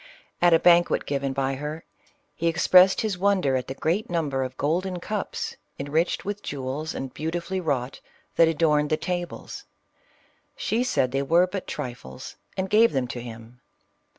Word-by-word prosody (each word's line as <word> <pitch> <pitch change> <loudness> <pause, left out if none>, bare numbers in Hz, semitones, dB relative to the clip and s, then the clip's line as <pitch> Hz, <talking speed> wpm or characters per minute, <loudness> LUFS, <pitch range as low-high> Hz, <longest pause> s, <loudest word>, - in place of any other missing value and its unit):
At 175 0 +6
a 165 - +7
banquet 175 +1 +4
given 140 -1 -1
by 135 0 -1
her, 150 +4 -5 0.5
he 170 - -2
expressed 180 +3 +5
his 210 -5 -2
wonder 185 -9 +2
at 130 -1 -2
the 135 - -5
great 175 +10 -1
number 150 -6 -1
of 130 0 -6
golden 180 +5 -1
cups, 210 +3 -4 0.2
enriched 150 +5 -1
with 205 +1 -4
jewels, 140 +3 -4
and 135 -1 -5
beautifully 170 +4 -3
wrought, 135 -6 -2 0.4
that 165 - +6
adorned 150 -2 +2
the 155 - +2
tables. 175 0 -5 0.9
She 235 +3 0
said 130 - +1
they 135 +1 0
were 170 +6 +4
but 185 +1 -6
tri 125 - -4
fles, 65 - -11 0.2
and 190 0 -1
gave 220 +2 +4
them 130 -2 0
to 120 - -5
him. 115 +1 -11
160 Hz, 165 wpm, -25 LUFS, 135-180 Hz, 0.9 s, a